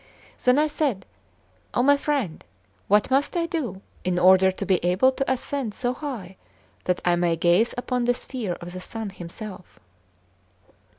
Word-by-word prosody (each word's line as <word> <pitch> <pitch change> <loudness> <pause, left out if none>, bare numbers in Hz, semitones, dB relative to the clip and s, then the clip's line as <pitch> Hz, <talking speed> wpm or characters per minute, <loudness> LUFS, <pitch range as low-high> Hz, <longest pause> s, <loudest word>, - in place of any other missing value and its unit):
Then 250 +1 +5
I 300 - +4
said: 290 -10 -1 0.7
"Oh, 245 - +3
my 285 +2 +6
friend! 280 - -2 0.4
what 210 +4 +3
must 280 +6 +2
I 335 - +1
do 295 - -4 0.2
in 180 -1 0
order 190 +1 +6
to 190 +2 -4
be 185 -2 +1
able 185 +9 +4
to 270 0 -1
ascend 260 -3 -2
so 245 0 -1
high 235 - -6 0.5
that 180 -1 0
I 175 -1 +4
may 175 -1 +1
gaze 175 +7 +3
upon 250 0 -1
the 245 0 +3
sphere 240 -8 -4
of 175 +1 -9
the 185 - -6
sun 220 +1 -6
himself?" 185 +1 -9
215 Hz, 165 wpm, -25 LUFS, 185-265 Hz, 0.7 s, my